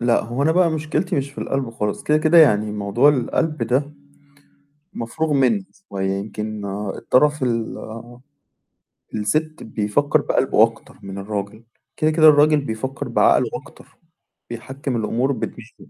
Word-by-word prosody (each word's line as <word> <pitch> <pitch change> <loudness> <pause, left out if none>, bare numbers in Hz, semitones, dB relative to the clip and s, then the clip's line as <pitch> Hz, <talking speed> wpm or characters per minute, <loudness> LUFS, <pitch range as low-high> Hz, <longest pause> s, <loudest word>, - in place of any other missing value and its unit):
لأ، 120 0 +2
هو 120 +5 -3
أنا 160 +2 +3
بقى 175 -1 +3
مشكلتي 155 +3 -2
مش 140 0 -2
في - - -15
القلب 135 -4 -2
خالص، 105 -3 -3
كده، 150 0 +2
كده 155 +2 +4
يعني 105 -9 +4
موضوع 105 +7 +2
القلب 150 +2 0
ده 135 +6 0 1.0
مفروغ 120 +7 -3
مِنّه 165 - +2 0.2
شوية 95 -1 -2
يمكن 105 +1 -4 0.3
الطرف 150 +2 +2
ال 115 0 -4 0.9
السِت 155 +9 -1
بيفكّر 145 +8 0
بقلبه 130 -4 +2
أكتر 115 0 -3
من 100 0 -8
الراجل، 100 +2 -5 0.3
كده، 155 0 +2
كده 155 0 +5
الراجل 150 0 +5
بيفكّر 130 +1 -5
بعقله - - +3
أكتر، - - -11 0.5
بيحكّم 130 +2 -5
الأمور 120 +4 0
بدماغه. 120 -2 -7
130 Hz, 135 wpm, -21 LUFS, 110-150 Hz, 1.0 s, كده